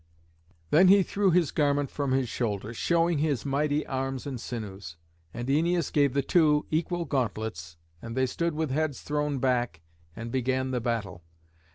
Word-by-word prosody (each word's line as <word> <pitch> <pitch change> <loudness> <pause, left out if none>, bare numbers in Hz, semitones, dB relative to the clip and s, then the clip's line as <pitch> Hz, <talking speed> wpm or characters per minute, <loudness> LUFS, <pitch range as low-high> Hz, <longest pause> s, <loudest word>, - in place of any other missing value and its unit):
Then 180 +5 +6
he 195 +1 +7
threw 200 +1 +1
his 175 -3 +3
garment 145 -2 +1
from 140 -2 -2
his 130 -1 +1
shoulders, 110 -1 -3
showing 170 +3 +2
his 145 -4 0
mighty 145 +2 0
arms 135 0 -3
and 130 -5 -5
sinews. 100 -9 -7 0.3
And 120 +5 -5
Æneas 165 +3 +1
gave 140 -3 +3
the 140 - +2
two 150 -2 +3
equal 170 +2 -1
gauntlets, 110 - -3 0.2
and 115 +1 -7
they 130 - +3
stood 170 +5 -2
with 155 -3 -1
heads 155 -1 -1
thrown 150 -1 -1
back, 125 -9 0 0.3
and 115 +1 -6
began 130 +1 0
the 125 -2 -1
battle. 110 -7 -3
135 Hz, 165 wpm, -28 LUFS, 120-155 Hz, 0.3 s, he